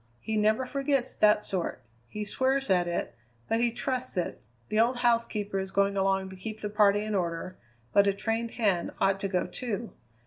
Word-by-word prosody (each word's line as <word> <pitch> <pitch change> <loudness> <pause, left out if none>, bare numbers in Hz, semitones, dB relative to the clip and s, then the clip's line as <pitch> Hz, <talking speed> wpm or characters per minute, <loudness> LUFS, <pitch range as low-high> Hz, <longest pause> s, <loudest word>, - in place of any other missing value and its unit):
He 220 - -3
never 215 +4 +2
forgets 275 -1 0
that 210 0 +5
sort; 175 -9 -3 0.2
he 210 - -5
swears 265 +2 +1
at 180 -2 +3
it, 170 -8 -2 0.3
but 225 - +1
he 240 0 +3
trusts 255 0 -2
it. 175 - -2 0.3
The 215 - +1
old 240 +2 +3
housekeeper 230 -4 +1
is 190 0 -3
going 200 +1 +1
along 195 0 +1
to - - -9
keep 215 +4 -7
the 210 -1 -4
party 205 -1 +4
in 215 0 -3
order, 180 -1 -2 0.4
but 200 0 +5
a 200 - +3
trained 225 +3 -1
hand 200 -7 +1
ought 195 0 +2
to 195 - -1
go, 185 -2 0
too. 230 -2 -4
210 Hz, 195 wpm, -28 LUFS, 195-230 Hz, 0.4 s, that